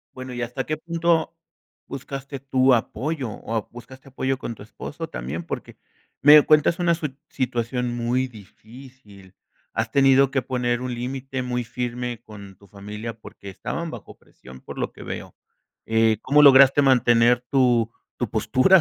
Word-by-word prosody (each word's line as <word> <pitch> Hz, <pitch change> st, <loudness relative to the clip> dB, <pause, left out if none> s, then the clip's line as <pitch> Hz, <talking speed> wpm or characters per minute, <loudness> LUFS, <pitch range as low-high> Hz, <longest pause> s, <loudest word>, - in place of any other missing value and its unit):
Bueno, 130 Hz, 0 st, -7 dB
¿y 120 Hz, -, -4 dB
hasta 125 Hz, +3 st, -3 dB
qué 155 Hz, -, -2 dB
punto 165 Hz, 0 st, 0 dB, 0.5 s
buscaste 135 Hz, +1 st, -7 dB
tu 130 Hz, -1 st, +3 dB
apoyo, 130 Hz, +3 st, -2 dB
o 110 Hz, -, -7 dB
a 110 Hz, -, -2 dB
buscaste 130 Hz, +3 st, -13 dB
apoyo 130 Hz, 0 st, -2 dB
con 120 Hz, -, -5 dB
tu 105 Hz, -, -13 dB
esposo 110 Hz, -, -8 dB
también? 65 Hz, +8 st, -5 dB
Porque, -, -, -7 dB, 0.5 s
me 150 Hz, +1 st, +9 dB
cuentas 155 Hz, +3 st, +3 dB
una 175 Hz, -1 st, +2 dB
sui 150 Hz, -5 st, -5 dB
situación 125 Hz, -1 st, -2 dB
muy 125 Hz, +2 st, 0 dB
difícil. 110 Hz, -2 st, -15 dB, 0.4 s
Has 110 Hz, 0 st, -2 dB
tenido 135 Hz, 0 st, +5 dB
que 135 Hz, 0 st, +1 dB
poner 120 Hz, -1 st, -1 dB
un 125 Hz, -1 st, -3 dB
límite 130 Hz, +2 st, -4 dB
muy 125 Hz, -1 st, -2 dB
firme 120 Hz, 0 st, -4 dB
con 100 Hz, -4 st, -12 dB
tu 100 Hz, 0 st, -20 dB
familia, 105 Hz, +3 st, -8 dB
porque, 100 Hz, -, -12 dB
estaban 165 Hz, -, -5 dB
bajo -, -, -10 dB
presión 65 Hz, 0 st, -15 dB
por -, -, -10 dB
lo -, -, -2 dB
que -, -, -13 dB
veo. -, -, -7 dB, 0.5 s
Eh, 110 Hz, -1 st, +3 dB
¿cómo 145 Hz, +2 st, +4 dB
lograste 140 Hz, 0 st, +7 dB
mantener 120 Hz, -2 st, +4 dB
tu 120 Hz, -4 st, +3 dB, 0.3 s
tu 120 Hz, -4 st, -2 dB
postura 130 Hz, -, +4 dB
125 Hz, 160 wpm, -23 LUFS, 115-135 Hz, 0.5 s, me